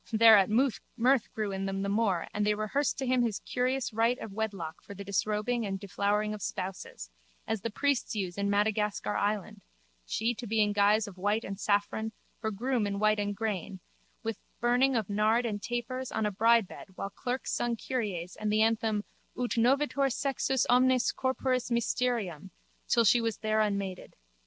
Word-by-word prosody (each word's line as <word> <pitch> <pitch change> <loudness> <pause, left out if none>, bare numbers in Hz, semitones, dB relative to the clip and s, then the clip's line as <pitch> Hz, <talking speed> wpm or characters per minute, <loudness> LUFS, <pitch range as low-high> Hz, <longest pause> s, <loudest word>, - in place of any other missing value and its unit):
Thereat 220 -3 +7
mirth 250 +1 +1
grew 215 -2 -2
in 195 0 -3
them 195 0 -2
the - - -1
more 200 -4 +1
and 210 - 0
they 210 0 +2
rehearsed 215 +8 0
to 270 - -2
him 255 0 +2
his 230 -4 0
curious 255 -1 -1
rite 230 +3 +2
of 215 - -8
wedlock 195 -7 -4
for 200 - -10
the 200 - -7
disrobing 210 +4 0
and 195 -2 -3
deflowering 205 +2 0
of 210 - -7
spouses, 185 - -5 0.3
as 220 -2 -2
the 230 - -2
priests 280 +1 0
use 185 -4 -2
in 200 0 -1
Madagascar 210 0 0
island, 205 -1 -1 0.5
she 230 +2 0
to 235 +1 -7
be 220 +1 0
in 210 -1 +3
guise 205 +2 +3
of 185 -2 -11
white 205 +4 +1
and 195 0 -6
saffron, 215 +2 0 0.3
her 220 - -2
groom 230 +1 -1
in 200 0 -2
white 215 +1 +3
and 205 0 -1
grain, 200 -3 -3 0.4
with 225 -2 -3 0.2
burning 250 +2 +3
of 220 -5 0
nard 215 +4 +2
and 205 -3 -3
tapers, 240 +2 -3
on 220 - -1
a 210 - 0
bridebed 225 +1 +2
while 195 - -5
clerks 250 +3 -3
sung 240 -1 0
kyries 200 -9 -3
and 215 -1 -2
the 215 +1 +4
anthem 220 -2 +1 0.3
Ut 245 -1 -2
novetur 275 +3 +2
sexus 265 -1 0
omnis 255 0 +4
corporis 260 -1 -1
mysterium 235 - -1 0.4
till 235 - +4
she 235 +3 +5
was 225 -2 -1
there 215 0 +1
unmaided. 200 -3 -2
215 Hz, 180 wpm, -30 LUFS, 200-240 Hz, 0.5 s, Thereat